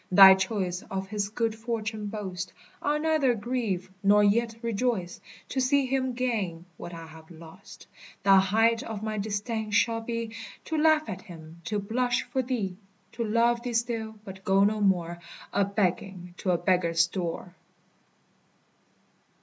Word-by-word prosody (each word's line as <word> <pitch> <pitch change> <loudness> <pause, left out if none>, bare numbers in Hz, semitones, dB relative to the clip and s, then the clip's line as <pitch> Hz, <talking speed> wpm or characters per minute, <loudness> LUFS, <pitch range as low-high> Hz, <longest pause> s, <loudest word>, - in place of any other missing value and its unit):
Thy 190 +1 +10
choice 190 -2 -1
of 190 0 -4
his 205 -1 -2
good 225 +1 -1
fortune 220 -2 -4
boast; 190 -3 -5 0.3
I 290 - +1
'll - - -4
neither 310 -6 +2
grieve 210 -5 -2
nor 205 +1 +5
yet 225 +3 +2
rejoice, 225 -5 -1 0.3
To 265 - -2
see 275 +1 +3
him 260 -1 0
gain 210 -9 -2
what 175 - -8
I 165 -1 -8
have 160 0 -14
lost; 165 -1 -13 0.4
The 195 0 +7
height 225 +4 +3
of 220 -2 -6
my 215 -1 -2
disdain 215 +2 -3
shall 225 +2 +2
be, 230 -1 -4 0.3
To 320 - -3
laugh 310 0 +4
at 190 -2 -5
him, 165 -2 -12
to 210 - -1
blush 245 +5 0
for 265 - -1
thee; 225 -8 -3 0.3
To 235 - -3
love 235 +2 +2
thee 245 0 -4
still, 225 -1 -1
but 190 -1 -10
go 195 +1 +4
no 210 +1 +2
more 175 -4 +1 0.3
A 200 -1 +3
begging 190 -2 -2
to 190 - -3
a 175 - +3
beggar's 170 -1 +2
door. 175 0 -4
210 Hz, 160 wpm, -27 LUFS, 185-235 Hz, 0.4 s, Thy